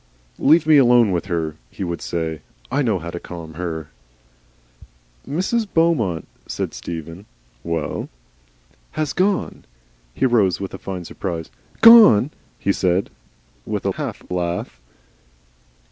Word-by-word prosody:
"Leave 155 +2 +5
me 155 -1 +6
alone 120 -5 +5
with 90 +1 -2
her," 80 -4 -2
he - - -6
would 85 -2 -4
say; 80 -3 -3 0.3
"I 140 +3 +1
know 115 -7 +1
how 85 0 -6
to 85 - -5
calm 85 -3 -9
her." 80 -3 -5 1.4
"Mrs. 200 +9 -1
Beaumont," 125 - +1 0.2
said - - -4
Stephen. 85 +4 -7 0.4
"WELL?" 85 -3 -3 0.8
"Has 155 -2 -2
gone." 190 +1 0 0.5
He - - +1
rose 110 -8 +3
with 95 - -5
a - - -7
fine 90 -3 -6
surprise. 85 -4 -5 0.3
"Gone!" 220 - +8 0.3
he 100 - 0
said 95 +1 0 0.5
with - - -4
a - - +2
half - - -5
laugh. 85 -8 -3
95 Hz, 130 wpm, -21 LUFS, 85-140 Hz, 1.4 s, Gone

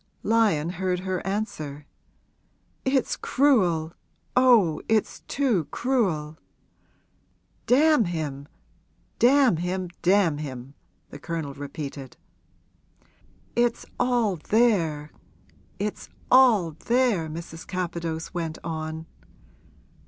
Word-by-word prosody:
Lyon 210 -9 +2
heard 180 0 -2
her 185 -1 -3
answer. 155 -9 -4 1.0
'It's 265 -1 +1
cruel 180 - +2 0.4
oh, 230 -11 +4
it's 220 -1 +1
too 240 - +1
cruel!' 175 - -1 1.3
'Damn 295 -2 +5
him 150 -5 -4 0.7
damn 255 - +5
him 180 +1 -3
damn 180 -5 +3
him!' 135 -2 -7 0.4
the 145 - -9
Colonel 160 -2 -4
repeated. 140 -2 -7 1.4
'It's 240 -1 +1
all 240 -6 +1
there 170 -10 +2 0.7
it's 210 +1 -4 0.2
all 235 -10 +6
there!' 215 0 0
Mrs. 165 +1 -8
Capadose 170 -3 -4
went 165 -3 -3
on. 160 0 -5
180 Hz, 85 wpm, -25 LUFS, 155-230 Hz, 1.4 s, all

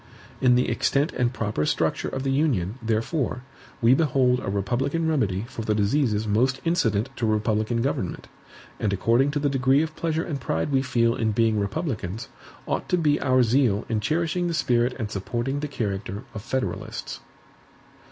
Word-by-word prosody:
In 125 -1 +5
the 125 - +2
extent 140 +3 +1
and 120 -1 +1
proper 105 -10 -2
structure - - 0
of 130 - -4
the 135 - 0
Union, 130 - 0
therefore, 115 +4 -1 0.4
we 115 +2 +6
behold 130 -4 +3
a - - -4
republican 125 +11 0
remedy 110 -10 0
for 125 -3 -7
the 110 -1 0
diseases 110 0 +1
most 125 +6 +1
incident 115 - +1
to 115 - 0
republican 110 +2 +1
government. 115 -9 -2 0.5
And 105 - 0
according 115 +8 +3
to 145 - -2
the 145 0 +1
degree 135 +1 +3
of 160 -1 -5
pleasure 160 0 -1
and 145 -6 -4
pride 80 - -1
we 135 -1 +3
feel 115 -3 +2
in 110 -3 0
being 110 -1 +2
republicans, 110 - -3 0.4
ought - - -2
to 180 - +3
be 150 -3 +2
our 130 -1 +4
zeal 120 -3 +2
in 110 - +1
cherishing 165 - 0
the 170 - -1
spirit 125 -3 +2
and 110 -4 -4
supporting 120 +7 -2
the 150 - -3
character 100 -5 -4
of 110 - -6
Federalists. 130 +4 -4
125 Hz, 170 wpm, -25 LUFS, 110-140 Hz, 0.5 s, we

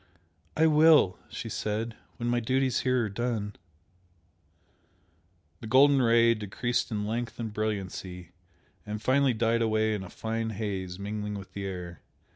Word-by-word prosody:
"I 160 - +5
will!" 155 - +5
she - - -6
said 110 +2 -3 0.2
"When 120 - -3
my 120 0 +2
duties 130 +2 +1
here 125 -2 +1
are - - -3
done." 105 -1 -3 2.0
The 110 - -8
golden 135 +3 +5
Ray 115 -1 +5
decreased 115 +3 -2
in 105 -2 -2
length 115 +2 -3
and 110 -2 -4
brilliancy, 95 -4 -4 0.5
and 105 +1 -5
finally 130 +2 +2
died 115 +1 +1
away 110 -1 +2
in 105 - -3
a 95 - -8
fine 115 0 -3
haze 95 -4 -3
mingling 105 +1 -4
with 100 -2 -9
the 100 -1 -4
air. 90 -2 -7
110 Hz, 145 wpm, -28 LUFS, 105-120 Hz, 2.0 s, I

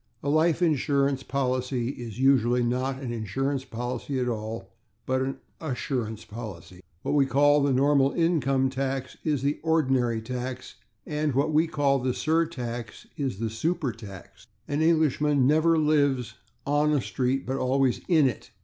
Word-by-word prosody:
A 140 - -1
life 160 +3 +3
insurance 140 -3 +1
policy 130 -2 -1
is 120 -4 -7
usually 125 -2 +3
not 130 +2 -1
an 120 -2 -3
insurance 130 +5 -2
policy 125 +2 -4
at 125 - 0
all, 110 -4 -4 0.3
but 130 0 0
an 135 +1 -2 0.2
/assurance/ 125 -6 -3
policy. 95 -5 -9 0.2
What - - -1
we 140 -2 +4
call 145 +3 +4
the 140 0 +2
normal 135 +1 +3
income 135 -6 +1
tax 135 -1 -3
is 145 -4 0
the 145 +2 0
/ordinary/ 130 -8 +1
tax; 125 +1 -5 0.3
what 150 0 0
we 160 +2 +4
call 140 -3 +1
the 130 0 -1
surtax 125 -9 -2
is 135 -10 -2
the 115 - -2
/supertax/. 115 - -4 0.2
An 145 +2 -1
Englishman 150 -4 +3
never 160 +4 +4
lives 145 -5 +2 0.3
/on/ 150 +1 +2
a - - 0
street, 130 +2 -1
but 135 +1 -2
always 130 -1 +1
/in/ 160 -5 +4
it. 125 -4 -2
135 Hz, 150 wpm, -26 LUFS, 125-145 Hz, 0.3 s, we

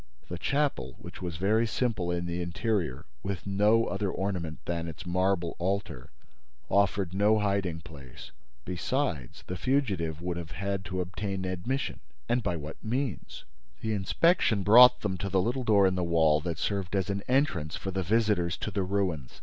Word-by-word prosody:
The 85 - -5
chapel, 145 +5 0
which - - -11
was 85 -4 -4
very 110 +6 +2
simple 110 -7 -1
in 85 0 -1
the 85 +1 -3
interior, 85 - -2 0.2
with 95 -3 -4
no 105 +3 +3
other 100 -2 -2
ornament 90 -5 -3
than 85 -1 -2
its 85 +4 -8
marble 90 -1 0
altar, 95 -8 -2 0.6
offered 100 -2 +2
no 105 +3 +4
hiding 100 -5 0
place. 70 -7 -12 0.3
Besides, 90 - -2
the 90 - -4
fugitive 95 - 0
would 90 0 -3
have 85 -3 -6
had 100 +4 -2
to 95 0 -2
obtain 95 +1 -4
admission. 95 +10 -2 0.3
And 120 +1 +1
by 90 -6 -1
what 75 +1 -8
means? 125 - -3 0.4
The 110 -1 -1
inspection 105 - +2
brought 125 +4 +8
them 95 -3 -2
to 100 - -3
the 95 0 +2
little 125 +7 0
door 105 -4 +5
in 95 - +3
the 90 -1 -1
wall 80 -3 +3
that 85 -1 -3
served 95 +3 -2
as 95 0 0
an 100 0 -2
entrance 125 - +1
for 95 - -4
the 95 0 -1
visitors 100 -3 +1
to 110 - -4
the 100 -1 -1
ruins. 90 -8 -2
95 Hz, 175 wpm, -29 LUFS, 85-105 Hz, 0.6 s, brought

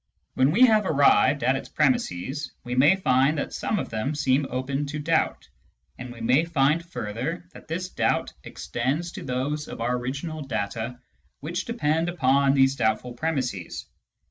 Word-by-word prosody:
When 130 +1 +3
we 190 +11 +1
have 215 -4 +3
arrived 140 -1 +4
at 130 - +3
its 135 - -6
premisses, 145 - -1
we 125 - -5
may 140 +8 +5
find 140 -4 +2
that 145 - -3
some 215 - -1
of - - -3
them 115 +7 -2
seem 135 -1 +1
open 135 +3 -2
to 150 +2 -4
doubt, 160 +2 0 0.5
and 125 0 -8
we 120 -1 -11
may 125 +7 +3
find 160 0 +1
further 150 +2 -5
that - - -14
this 175 +3 -3
doubt - - 0
extends 145 +8 -3
to - - -8
those 135 +4 -2
of - - -8
our 120 +2 0
original 140 +6 -4
data 120 -1 -4 0.4
which 175 +6 -4
depend 165 -7 0
upon 140 -4 +3
these 135 0 +4
doubtfiJ 110 +1 -1
premisses. 125 - -3
140 Hz, 165 wpm, -25 LUFS, 125-160 Hz, 0.5 s, may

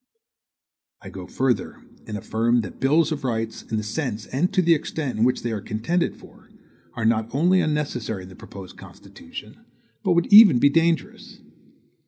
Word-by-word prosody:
I - - -9
go - - -9
further, 130 -2 -2 0.2
and 105 - -4
affirm 115 +4 0
that 95 - -9
bills 155 +4 +2
of 145 -2 -4
rights, 115 -3 -3
in 110 - -4
the 110 - -2
sense 110 -2 -4
and 150 - -1
to 190 -2 +2
the 170 0 +5
extent 145 -5 -3
in - - +3
which 125 +1 +1
they 120 - -2
are 105 -2 -3
contended 120 - -2
for, - - -18 0.5
are 115 - -3
not 110 0 +1
only 180 +5 +3
unnecessary 125 -10 -3
in 90 - -12
the 95 - -13
proposed 95 -2 -12
Constitution, - - -12 0.4
but - - +1
would 170 0 +2
even 205 - +9
be 140 +4 +4
dangerous. 165 +2 -1
125 Hz, 175 wpm, -23 LUFS, 110-160 Hz, 0.5 s, even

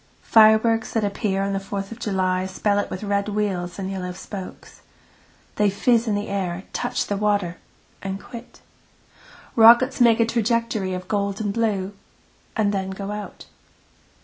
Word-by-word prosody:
Fireworks 220 +1 +4
at 225 - +2
a 205 - 0
pier 195 -2 -1
on 200 0 -1
the 195 - 0
Fourth 195 +1 -5
of 230 - -8
July 185 -3 0
spell 200 +2 0
it - - -2
with 185 - -6
red 200 0 0
wheels 195 -4 -2
and 195 -1 -4
yellow 180 -2 -4
spokes. 190 +1 -9 0.8
They 210 -1 +3
fizz 230 +4 +2
in 210 - +1
the 205 +1 -3
air, 190 -2 -3
touch - - -1
the 205 - -2
water 205 -4 0 0.4
and 195 0 -4
quit. 235 +3 -11 0.9
Rockets 240 +3 +6
make 235 -1 +5
a 230 - +4
trajectory 230 -4 0
of 180 0 -7
gold 200 -1 -1
and 205 -2 -2
blue 205 -4 -1 0.6
and 205 -2 +2
then 190 -1 -2
go 195 +1 -5
out. 210 -1 -7
205 Hz, 165 wpm, -23 LUFS, 190-220 Hz, 0.9 s, Rockets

